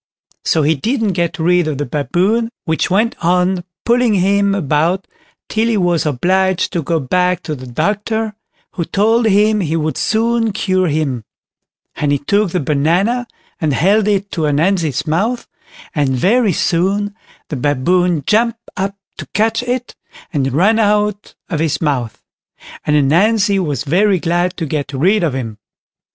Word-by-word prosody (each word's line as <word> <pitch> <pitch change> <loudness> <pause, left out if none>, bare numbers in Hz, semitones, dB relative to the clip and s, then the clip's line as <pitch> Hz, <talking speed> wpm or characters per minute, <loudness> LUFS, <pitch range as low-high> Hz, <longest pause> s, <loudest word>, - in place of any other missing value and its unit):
So 160 - +2
he 155 +3 +3
didn't 220 - -1
get 170 -1 -1
rid 175 0 +2
of 150 -3 -2
the 145 - -2
Baboon, 185 - 0 0.2
which 160 +1 0
went 215 +5 +1
on 180 +1 +1 0.2
pulling 235 -2 +3
him 200 +1 +2
about 170 +2 0 0.4
till 220 +1 0
he 230 -2 +1
was 175 -4 +1
obliged 185 +8 +1
to 170 - 0
go 165 +2 -1
back 180 +5 0
to 155 - -4
the 130 -3 -8
doctor, 210 - -1 0.4
who 175 - -3
told 225 +6 +2
him 210 +1 +3
he 165 -4 -1
would 155 -4 -1
soon 225 0 +1
cure 185 -2 +1
him; 145 -6 -1 0.7
and 145 -1 -1
he 145 - +3
took 200 +8 +1
the 180 - -1
banana, 175 - +1 0.3
and 155 -3 0
held 200 +8 +2
it 200 -1 0
to 160 -2 -1
Ananzi's 155 -1 +1
mouth, 210 +11 -1 0.5
and 145 -5 +1
very 210 - +3
soon 195 +5 0 0.3
the 150 - -3
Baboon 150 +5 +1
jumped 230 +2 +2 0.2
up 195 +1 -2 0.2
to - - -6
catch 225 +2 +2
it, 245 0 -3 0.4
and 135 -3 0
ran 200 - +3
out 210 -1 0
of 165 -5 -3
his 160 -1 0
mouth; 130 -8 -2 0.6
and 150 - +3
Ananzi 195 +8 +3
was 145 -7 -2
very 185 +6 +2
glad 175 +2 0
to 165 - -2
get 145 -1 -3
rid 190 +10 +2
of 155 -6 0
him. 115 -5 -5
180 Hz, 160 wpm, -16 LUFS, 155-210 Hz, 0.7 s, he